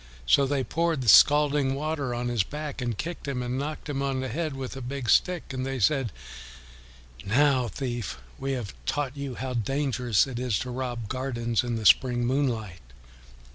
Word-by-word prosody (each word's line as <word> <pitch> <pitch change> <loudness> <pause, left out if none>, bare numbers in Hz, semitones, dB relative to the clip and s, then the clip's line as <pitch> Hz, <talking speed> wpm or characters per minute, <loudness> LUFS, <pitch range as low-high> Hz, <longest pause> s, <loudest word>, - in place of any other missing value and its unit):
So 135 - +4
they 140 -1 0
poured 165 0 0
the 125 - -4
scalding 145 +1 +6
water 145 -2 -2
on 120 +1 -2
his 120 -3 +1
back 150 +5 -5
and 120 -4 -2
kicked 170 +2 -5
him 130 -3 -2
and 125 +2 -2
knocked 150 +3 -5
him 140 -2 -2
on 135 -1 -1
the 130 0 -3
head 155 +3 -2
with 135 -1 -5
a 135 - -6
big 130 -1 -2
stick, 180 -6 +2
and 130 0 -3
they 135 0 -3
said, 130 -1 +2 1.1
"Now, 130 +3 +3
thief, 120 -3 -4 0.2
we 135 0 -2
have 120 - -4
taught 145 -2 -1
you 140 -3 -5
how 130 +1 -4
dangerous 125 -2 +1
it 130 -3 -5
is 125 -5 0
to 125 - -4
rob 120 -3 -4
gardens 120 -2 -1
in 120 -1 -2
the 110 -1 -4
spring 120 +3 +5
moonlight." 120 - -1
130 Hz, 185 wpm, -27 LUFS, 120-140 Hz, 1.1 s, scalding